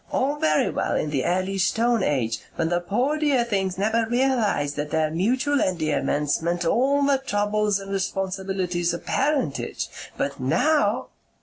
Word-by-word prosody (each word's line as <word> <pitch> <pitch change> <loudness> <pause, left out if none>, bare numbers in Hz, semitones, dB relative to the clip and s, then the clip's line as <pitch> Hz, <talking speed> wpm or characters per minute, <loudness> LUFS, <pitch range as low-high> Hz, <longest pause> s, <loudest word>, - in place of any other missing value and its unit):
All 280 +3 0
very 155 - +2
well - - -1
in 150 - -1
the 135 -3 -1
early 185 +2 0
Stone 230 +4 +2
Age 125 -9 0 0.2
when 165 -1 0
the 175 0 +1
poor 245 - 0
dear 285 -5 +2
things 195 -5 -1
never 220 +3 +1
realized 235 - +1
that 150 0 -2
their 155 0 0
mutual 255 - +1
endearments 155 -4 0
meant 170 +1 -1
all 275 +9 +2
the 280 -1 +3
troubles 210 -4 0
and 195 0 -8
responsibilities 190 -2 -1
of - - -9
parentage. 285 0 -1 0.3
But - - -2
NOW 310 -2 +1
195 Hz, 150 wpm, -24 LUFS, 170-250 Hz, 0.3 s, the